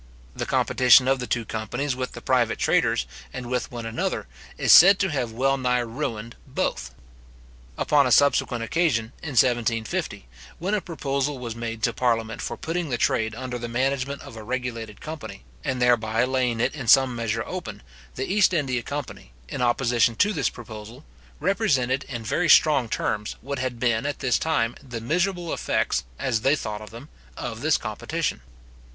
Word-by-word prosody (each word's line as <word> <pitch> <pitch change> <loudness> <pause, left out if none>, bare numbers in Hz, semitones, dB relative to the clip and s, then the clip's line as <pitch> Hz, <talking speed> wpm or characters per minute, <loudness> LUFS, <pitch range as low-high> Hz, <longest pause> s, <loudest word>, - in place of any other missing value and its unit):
The - - -4
competition 125 0 +5
of 135 0 +2
the 125 - -4
two 120 -2 -1
companies 120 +6 -3
with 130 0 -4
the - - -10
private - - +2
traders, 65 - +2 0.3
and 125 - -6
with 125 -1 -2
one 120 -2 -6
another, 115 0 -2 0.3
is - - +3
said 190 +3 +9
to 190 -1 0
have 125 -6 -2
well 135 +4 +1
nigh 125 -1 +1
ruined 115 -2 -4
both. - - -3 0.8
Upon 145 -3 +3
a - - -1
subsequent 125 -2 +3
occasion, 120 -5 0
in 150 -4 -5
1750, 115 - +1 0.3
when 190 +5 -2
a 210 - +1
proposal 140 -4 -2
was 120 -3 -6
made 115 -1 -5
to - - +2
parliament 115 -2 0
for - - -4
putting 165 0 -3
the 120 - -1
trade 110 -1 0
under 125 0 -5
the 120 - -4
management 135 +3 -1
of - - -11
a 110 - -8
regulated 115 -2 -5
company, 155 - -8 0.2
and 130 -1 -2
thereby 115 -2 +2
laying 125 -2 0
it - - +1
in 135 -6 -6
some 130 +1 +6
measure 115 -1 -1
open, 180 - -6 0.3
the 130 - -2
East 195 -2 +3
India 130 -6 0
company, 140 - -7 0.2
in - - -4
opposition 120 -1 +2
to 205 - +2
this - - 0
proposal, 110 +3 -10 0.3
represented, 140 - +1
in 120 -4 -6
very 165 +10 0
strong 140 -6 +5
terms, 105 -1 -2
what 140 +2 -4
had 125 -2 -3
been, 120 +2 +1
at 145 - -3
this 125 - +1
time, 120 -8 0
the 125 -3 -7
miserable 175 +7 -1
effects, - - 0
as 110 - -1
they 135 +5 +3
thought 105 -5 -6
them, 120 +6 -11 0.3
of 115 -1 -5
this 155 0 +3
competition. 130 - -3
125 Hz, 175 wpm, -24 LUFS, 115-140 Hz, 0.8 s, said